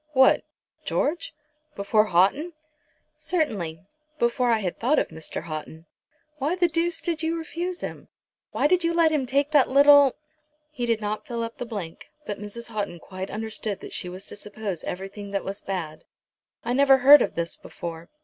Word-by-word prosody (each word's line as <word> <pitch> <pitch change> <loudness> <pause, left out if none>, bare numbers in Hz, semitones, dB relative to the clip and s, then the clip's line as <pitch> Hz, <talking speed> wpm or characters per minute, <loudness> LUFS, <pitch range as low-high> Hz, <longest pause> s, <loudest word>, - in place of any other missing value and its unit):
"What, 265 -1 +5 0.4
George? 330 +4 -1 0.4
Before 210 +2 +2
Houghton?" 210 - +2 0.7
"Certainly; 195 - -2 0.3
before 240 0 +1
I 230 - +4
had 190 -5 -3
thought 260 +7 +2
of - - +1
Mr. 160 0 -6
Houghton." 160 0 -7 0.5
"Why 295 +6 0
the 355 -1 +3
deuce 335 0 0
did 335 -3 -2
you 325 +1 -1
refuse 345 +2 -4
him? - - -6 0.4
Why - - 0
did 360 +3 +3
you 335 0 +1
let 330 -2 +4
him 285 -4 0
take 280 +3 +1
that 290 -4 +5
little 285 0 +7 0.3
" 300 0 -46
He 245 -5 -3
did 230 -2 +1
not 210 0 -3
fill 235 -2 -3
up 230 0 -7
the 245 - -4
blank, 195 -8 -7 0.2
but 205 - -4
Mrs. 210 +3 -7
Houghton 205 -5 -3
quite 185 +2 -7
understood 215 -2 -4
that - - -9
she 180 - -3
was 185 +2 -8
to - - -9
suppose 205 -4 -6
everything 195 +2 -6
that 200 -1 -2
was 195 +1 -5
bad. 160 -5 -5 0.6
"I 240 - 0
never 270 0 +6
heard 280 +3 +9
of - - -1
this 170 0 -2
before." 165 0 -8
235 Hz, 180 wpm, -25 LUFS, 195-295 Hz, 0.7 s, heard